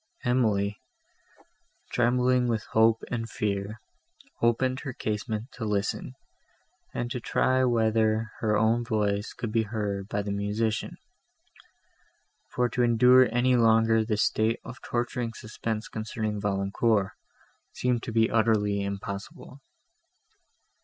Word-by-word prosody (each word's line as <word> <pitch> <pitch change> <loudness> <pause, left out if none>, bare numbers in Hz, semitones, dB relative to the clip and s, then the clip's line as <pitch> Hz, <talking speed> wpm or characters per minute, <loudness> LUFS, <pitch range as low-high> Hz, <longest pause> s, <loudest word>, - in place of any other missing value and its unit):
Emily, 105 -5 +1 1.1
trembling 125 +1 +2
with 115 -2 -1
hope 115 0 +4
and 115 -1 -3
fear, 100 +1 -3 0.6
opened 130 +3 +2
her 135 -3 -6
casement 110 +2 -4
to 120 - -7
listen, 105 -2 -2 0.8
and 120 0 -4
to 130 - -2
try 130 +2 +1
whether 110 -2 +1
her 110 -2 +1
own 115 +2 +2
voice 105 -3 -1
could 115 -3 -5
be 115 0 +2
heard 105 -3 -3
by 105 -1 -1
the 100 - -4
musician; 105 +2 -2 1.5
for 125 0 0
to 125 - -2
endure 125 +2 +6
any 125 +2 +3
longer 115 -1 +4
this 105 -1 0
state 110 +1 +1
of 125 - -9
torturing 120 -1 -2
suspense 110 0 -4
concerning 110 -1 -4
Valancourt, 100 +1 +1 0.6
seemed 125 -2 0
to 115 - -6
be 110 0 +3
utterly 105 -3 +2
impossible. 100 +6 -7
110 Hz, 120 wpm, -27 LUFS, 105-120 Hz, 1.5 s, endure